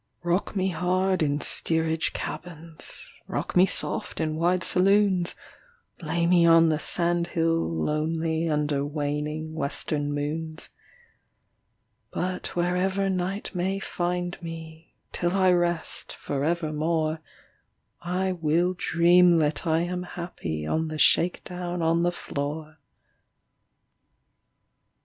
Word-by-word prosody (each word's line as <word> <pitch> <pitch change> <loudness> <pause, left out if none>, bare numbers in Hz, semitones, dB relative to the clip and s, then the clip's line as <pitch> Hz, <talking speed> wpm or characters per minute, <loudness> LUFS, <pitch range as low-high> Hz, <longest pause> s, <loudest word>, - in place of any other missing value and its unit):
Rock 175 +5 0
me 190 -1 +1
hard 185 +2 +1
in 145 -1 +1
steerage 160 0 +1
cabins, 165 -2 -7 0.2
Rock - - -4
me 180 +1 +6
soft - - -2
in 155 -1 -1
wide 175 +3 +1
saloons, 190 -1 +3 0.7
Lay 170 +1 0
me 175 0 +5
on 165 -1 +6
the 155 -1 +1
sand 170 +2 0
hill 165 - 0
lonely 160 - -1
Under 150 -2 0
waning 150 +2 -3
western 145 -1 -1
moons; 155 +2 -4 1.4
But 180 0 -4
wherever 185 +3 +1
night 190 +3 -3
may 185 +2 -1
find 175 -2 -3
me 165 -1 -9 0.2
Till 175 0 -1
I 190 -1 +4
rest 175 -1 +1
for 140 -1 -3
evermore 160 0 0 0.8
I 185 +2 -1
will 170 +1 +1
dream 175 0 +5
that 155 +2 0
I 160 0 +3
am 180 +1 -2
happy 170 - -5
On 160 - 0
the 155 0 -5
shake 170 +3 +3
down 180 -1 -4
on 165 +1 +2
the 175 0 +2
floor. 155 -1 -5
170 Hz, 115 wpm, -26 LUFS, 155-180 Hz, 1.4 s, me